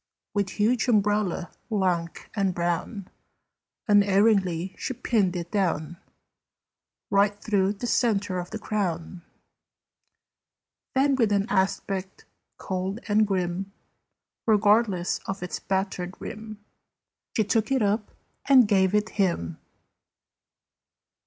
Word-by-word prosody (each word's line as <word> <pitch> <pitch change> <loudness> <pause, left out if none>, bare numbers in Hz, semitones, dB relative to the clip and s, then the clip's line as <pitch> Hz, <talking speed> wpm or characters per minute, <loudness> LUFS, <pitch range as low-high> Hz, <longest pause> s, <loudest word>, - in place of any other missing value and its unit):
With 200 -2 0
huge 230 +3 +2
umbrella, 205 -5 +1 0.2
lank 180 -6 -1
and 195 -3 0
brown, 175 +3 -2 0.8
Unerringly 200 -3 +3
she 260 - -4
pinned 200 -7 +1
it 175 -1 -5
down, 175 -4 -1 1.1
Right 200 +1 +3
through 200 -2 +1
the 210 +4 -6
centre 205 -6 +1
of 175 0 -6
the 220 - -5
crown. 185 -5 -3 1.7
Then, 275 +1 +3
with 225 -5 +2
an 200 -1 +2
aspect 190 -2 -1 0.3
cold 190 +3 -3
and 215 0 +3
grim, 190 0 -2 0.7
Regardless 210 -3 +3
of 190 -1 -4
its 180 - -4
battered 190 -1 -2
rim, 215 0 -7 0.8
She 220 - +4
took 220 +3 0
it 265 -4 +2
up 210 +1 0 0.4
and 260 -5 +7
gave 190 -1 +3
it 210 +1 +1
him. 125 - -1
200 Hz, 105 wpm, -26 LUFS, 185-215 Hz, 1.7 s, and